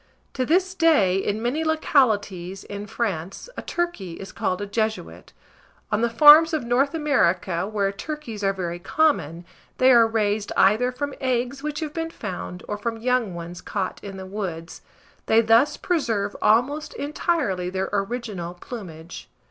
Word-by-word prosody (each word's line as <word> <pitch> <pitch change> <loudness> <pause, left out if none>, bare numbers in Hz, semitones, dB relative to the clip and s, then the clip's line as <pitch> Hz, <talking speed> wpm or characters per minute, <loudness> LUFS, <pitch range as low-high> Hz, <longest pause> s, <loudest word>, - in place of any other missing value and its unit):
To 255 -2 -2
this 370 +3 +2
day, 305 - +3
in 205 +3 -2
many 275 +7 0
localities 205 - +1
in 205 0 -7
France, 195 - -4
a - - -5
turkey 345 - -3
is 195 +3 -9
called 185 0 -2
a 205 - -3
Jesuit. 215 +2 -3 0.6
On 210 - +1
the 235 - +2
farms 300 +7 +8
of 310 -5 0
N. 235 - -8 0.2
America, 190 - +1
where 205 -2 0
turkeys 230 -2 -6
are 195 - +3
very 175 -3 -4
common, 175 - 0 0.3
they 260 +1 +5
are 235 -2 +6
raised 215 -2 -1
either 220 +6 +4
from 285 +2 -4
eggs 255 +1 -1
which 300 +1 -4
have 305 -2 -4
been 325 0 -3
found, 185 - -7
or 210 - -4
from 225 +1 -3
young 235 -5 0
ones 170 +1 -7
caught 195 -3 -4
in 195 -1 -7
the 190 - -7
woods: 185 -4 -6 0.5
they 220 - +5
thus 230 +5 +4
preserve 225 - -1
almost 265 +8 +2
entirely 285 - -1
their 190 +1 -2
original 200 -4 -3
plumage. 175 -5 -9
220 Hz, 155 wpm, -24 LUFS, 190-275 Hz, 0.6 s, farms